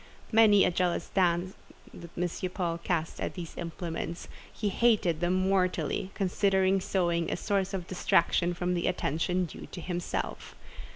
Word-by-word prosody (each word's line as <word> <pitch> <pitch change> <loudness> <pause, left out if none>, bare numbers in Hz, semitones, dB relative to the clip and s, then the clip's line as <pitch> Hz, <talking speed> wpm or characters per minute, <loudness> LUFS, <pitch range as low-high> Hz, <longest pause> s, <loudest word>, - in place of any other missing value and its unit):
Many 215 -3 +6
a - - +2
jealous 175 0 -1
glance 180 0 +2 0.4
did 170 0 -10
M. 180 +1 -2
Paul 170 -3 -1
cast 170 -1 -2
at - - -3
these 175 -4 -7
implements; 170 0 -5 0.2
he 210 - -2
hated 200 -7 +2
them 175 +1 +1
mortally, 185 0 +1
considering 190 0 +2
sewing 170 -3 0
a - - -1
source 195 0 0
of 190 -3 -4
distraction 175 -1 +2
from 180 +1 -1
the 175 -1 0
attention 180 +1 0
due 165 - -9
to - - -8
himself. 175 0 -4
180 Hz, 150 wpm, -29 LUFS, 170-190 Hz, 0.4 s, Many